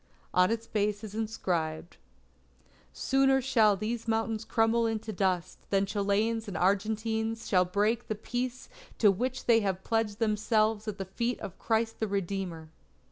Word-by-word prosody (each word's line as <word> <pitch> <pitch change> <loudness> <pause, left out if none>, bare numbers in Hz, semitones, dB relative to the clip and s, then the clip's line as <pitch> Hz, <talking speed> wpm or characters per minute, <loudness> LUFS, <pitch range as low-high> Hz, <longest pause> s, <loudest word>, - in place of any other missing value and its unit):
On 180 0 +4
its 230 0 -2
base 210 -1 -1
is 210 -2 -7
inscribed: 175 -7 -2 0.9
_Sooner 270 - +3
shall 230 -6 +4
these 225 +3 -3
mountains 225 0 0
crumble 225 +1 +2
into 220 -1 -3
dust, 185 -2 -1
than 195 0 +2
Chileans 210 +3 0
and 190 -5 -4
Argentines 220 +4 0
shall 180 -2 +4
break 210 +6 0
the 215 - -2
peace 245 +3 -4 0.3
to 210 -3 +6
which 250 +6 -3
they 230 -1 +5
have 190 -3 -2
pledged 225 -2 0
themselves 215 0 +1
at 210 -2 -3
the 195 - -4
feet 235 +6 -2
of 185 - -8
Christ 225 0 0
the 220 - 0
Redeemer. 190 -4 -3
215 Hz, 150 wpm, -29 LUFS, 195-225 Hz, 0.9 s, to